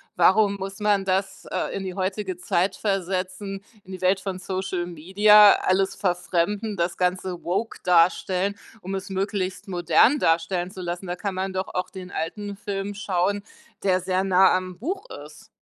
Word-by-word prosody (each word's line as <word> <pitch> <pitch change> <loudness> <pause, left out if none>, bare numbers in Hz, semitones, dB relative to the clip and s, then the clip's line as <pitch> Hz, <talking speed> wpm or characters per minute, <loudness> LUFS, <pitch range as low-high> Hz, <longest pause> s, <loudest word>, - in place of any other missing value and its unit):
Warum 200 +3 +4
muss 195 0 -6
man 205 -2 +2
das, 190 0 -1
äh, - - -2
in 195 - -3
die 185 -1 -4
heutige 190 0 -3
Zeit 185 +2 0
versetzen, 195 0 -3 0.2
in 190 - -13
die 185 - -7
Welt 185 +1 +3
von 190 -1 -5
Social 185 -2 -3
Media, 205 +5 +6
alles 190 +1 +2
verfremden, 190 +3 -1
das 170 -1 -1
Ganze 180 -1 -1
woke 200 +6 -2
darstellen, 180 +3 +2 0.3
um 190 +2 -4
es 190 +1 -5
möglichst 190 0 -2
modern 185 - +4
darstellen 175 -1 +1
zu 190 - -8
lassen. 175 +2 -4
Da 175 - -3
kann 195 0 -4
man 190 0 -2
doch 185 0 -2
auch 180 - -2
den 185 -2 -8
alten 200 +5 -4
Film 200 0 -4
schauen, 200 0 -1 0.4
der 185 -2 +3
sehr 185 +1 0
nah 190 0 +5
am 185 -1 -4
Buch 380 - -4 0.2
ist. 150 0 -15
190 Hz, 170 wpm, -24 LUFS, 180-200 Hz, 0.4 s, Media